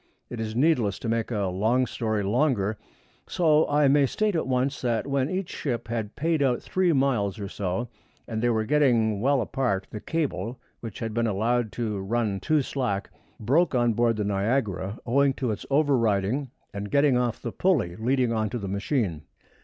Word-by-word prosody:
It 120 - -5
is 110 0 -4
needless 125 - +1
making 115 0 -1
a 100 -3 -1
long 110 +7 +2
story 110 -4 -2
longer, 110 -2 +1 0.5
so 155 -3 +3
I 145 0 +4
may 140 0 +4
state 210 +6 0
at 160 - -1
once 130 +2 0
that 120 -3 0
when 140 0 0
each 185 -1 -3
ship 120 -5 -3
had 115 -2 -3
paid 160 0 0
out 125 -3 +2
three 185 -2 +1
miles 130 - +1
or 100 - -4
so, 100 +4 -3 0.4
and 110 -1 -3
they 120 - +2
were 110 -2 +1
getting 115 -7 +2
well 135 +1 +3
apart, 105 -4 -1
the 105 - -5
cable, 125 - -3 0.2
which 115 -4 -7
had 115 -2 -4
been 115 +1 +1
allowed 110 +2 0
to 110 -4 -2
run 105 0 -1
too 150 +7 +1
slack, 120 -8 -2 0.3
broke 140 +7 +2
on 120 -2 +3
board 115 +1 +2
the 105 - -1
Niagara 100 0 -1
owing 135 +3 +3
to 125 -3 -2
its 105 - -6
overriding 130 -3 +1 0.2
and 100 0 -5
getting 140 0 +3
off 125 -2 0
the 115 - -5
pulley 155 - +1
leading 125 +2 +1
on 110 -1 0
to 120 - -3
the 100 -4 -5
machine. 100 - -1
120 Hz, 185 wpm, -26 LUFS, 105-140 Hz, 0.5 s, I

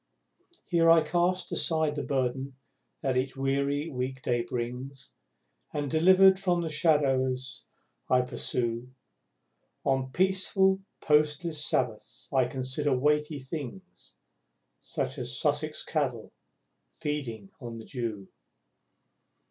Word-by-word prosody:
Here 165 -2 +3
I 165 -1 +7
cast 175 +2 0
aside 160 -2 +1
the 145 - -2
burden 135 0 -2 0.5
that 135 -2 +1
each 130 +1 -1
weary 140 +2 0
week 130 -2 -4
day 120 -1 +1
brings 125 +3 -5 0.6
And, 145 -2 -2
delivered 185 +4 +6
from 180 -3 +1
the 165 - -2
shadows 135 -5 +1 0.4
I 130 0 +5
pursue, 125 0 -2 0.9
On 130 -1 +1
peaceful, 190 +2 +2 0.2
postless, 150 +1 +2
Sabbaths 115 -5 -2
I 130 -2 +4
consider 130 +2 -1
Weighty 150 +2 +1
Things 140 - -8 0.6
Such - - -3
as - - -3
Sussex - - 0
Cattle - - -2 0.6
feeding 120 -9 -4
in 115 -1 -6
the 110 - -9
dew! 110 -6 -4
135 Hz, 110 wpm, -29 LUFS, 125-160 Hz, 0.9 s, I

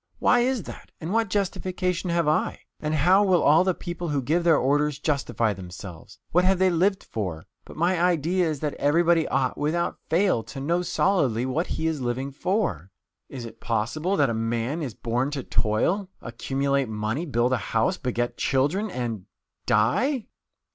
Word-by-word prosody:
Why 245 - +4
is 245 -3 +1
that? - - -11
And 165 +5 -4
what 225 -2 +1
justification 185 -2 -1
have 170 -2 +1
I? 155 - 0 0.2
And 150 0 -1
how 180 +7 +5
will 185 -3 +3
all 155 +4 +6
the 185 -1 +1
people 175 -1 -5
who 145 -1 0
give 165 +7 +1
their 165 -3 +5
orders 145 +2 +1
justify 140 -7 0
themselves? 90 0 -10
What 180 +2 +4
have 190 +1 +3
they 185 0 +3
lived 190 +3 +1
for? 90 -8 -5 0.2
But - - -12
my 175 +2 +1
idea 175 0 +2
is 150 -3 -4
that 150 -2 -1
everybody 165 +3 +3
ought, 130 -1 0
without 160 +4 -1
fail, 175 - +2
to 135 - -9
know 170 +6 0
solidly 140 - +1
what 155 +7 -1
he 160 - -3
is 160 -3 -1
living 130 +3 -2
for. 140 - -1 0.4
Is 125 -3 -7
it 115 - -11
possible 120 - -1
that 140 -5 +3
a - - -1
man 115 +7 -1
is 130 -8 -4
born 125 +3 -1
to 135 - -4
toil, 175 - 0
accumulate 135 +2 -1
money, 110 +9 -2
build 125 -2 +1
a - - +3
house, 115 - 0
beget 120 -1 -2
children, 150 +11 +1
and 115 - -4 0.4
die? 210 - +2
150 Hz, 175 wpm, -25 LUFS, 120-180 Hz, 0.4 s, all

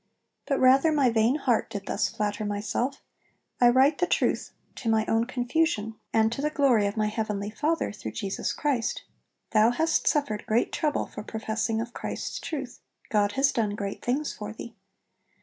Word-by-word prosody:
But 275 - +1
rather 270 +5 +5
my 280 -5 +3
vain 225 +3 +3
heart 255 -6 +1
did 200 -1 -6
thus - - 0
flatter 210 0 -2
myself, 210 +6 -2 0.6
(I 245 - +7
write 265 +4 +4
the 355 - +2
truth - - 0 0.3
to 230 - -2
my 220 -1 +3
own 225 +1 +1
confusion, 245 -2 0 0.2
and 220 0 +3
to 235 - -3
the 300 - +1
glory 260 -9 +3
of 200 - -4
my 215 - +2
heavenly 210 -1 -2
Father, 310 +8 0
through 210 - -7
Jesus 200 -3 -2
Christ), 270 -7 -1 0.5
'Thou 220 0 +5
hast 320 +7 +1
suffered 280 -8 0
great 225 +2 +1
trouble 300 -2 0
for - - -8
professing 220 +1 -2
of 235 +1 -5
Christ's - - -4
truth; 275 -6 -5 0.3
God 205 -1 +2
has 275 +1 +3
done 210 -3 -1
great 200 -1 -5
things 280 +5 -1
for 210 0 -6
thee.'... 225 +1 -9
230 Hz, 175 wpm, -27 LUFS, 215-275 Hz, 0.6 s, I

